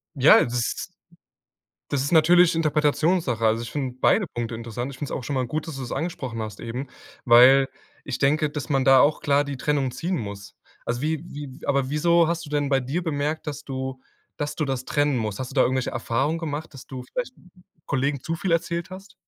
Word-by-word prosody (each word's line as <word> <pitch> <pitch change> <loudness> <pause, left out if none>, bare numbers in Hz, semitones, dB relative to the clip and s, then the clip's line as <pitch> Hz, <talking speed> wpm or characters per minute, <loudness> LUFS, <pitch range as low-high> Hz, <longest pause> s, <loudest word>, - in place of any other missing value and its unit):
Ja, 135 +2 +7
das 120 -1 -2 1.0
das 140 - 0
ist 140 - -3
natürlich 170 +2 +6
Interpretationssache. 155 -4 +1
Also 115 +1 +2
ich 115 - -6
finde 130 -4 -3
beide 200 +6 +3
Punkte 120 -3 -5
interessant. 115 +3 -5
Ich 135 - -10
find's 145 - -5
auch 125 - -4
schon 140 - -3
mal 130 -2 0
gut, 155 +6 -3
dass 145 - -6
du's 130 -3 -6
angesprochen 135 -7 -4
hast 105 -2 -6
eben, 125 +4 -5 0.4
weil 130 +3 +7 0.4
ich 135 - -4
denke, 150 +2 +2
dass 145 0 -6
man 135 -2 +2
da 135 -1 +7
auch 145 +3 +3
klar 145 0 +2
die 140 -2 -5
Trennung 140 -2 0
ziehen 175 +8 -3
muss. 100 -5 -7 0.3
Also, 120 +2 -2
wie 155 +1 0
wie 145 0 -9
aber 140 -1 +1
wieso 170 +2 +3
hast 170 -1 -2
du - - -11
denn 145 -1 0
bei 135 - +3
dir 140 +8 -2
bemerkt, 155 -1 -2
dass 145 -3 -5
du 130 -1 -5 0.4
dass 145 0 -3
du 155 - 0
das 135 -2 -3
trennen 145 -3 +1
musst? 105 -3 -3
Hast 130 -1 -5
du 135 - -11
da 135 - +3
irgendwelche 130 0 0
Erfahrungen 130 +7 -1
gemacht, 155 -1 -5
dass 135 -3 -12
du 130 -2 -7
vielleicht 250 - -5 0.5
Kollegen 140 0 -1
zu 165 - -3
viel 175 +1 -1
erzählt 170 0 -1
hast? 190 +1 -11
140 Hz, 210 wpm, -24 LUFS, 125-155 Hz, 1.0 s, Ja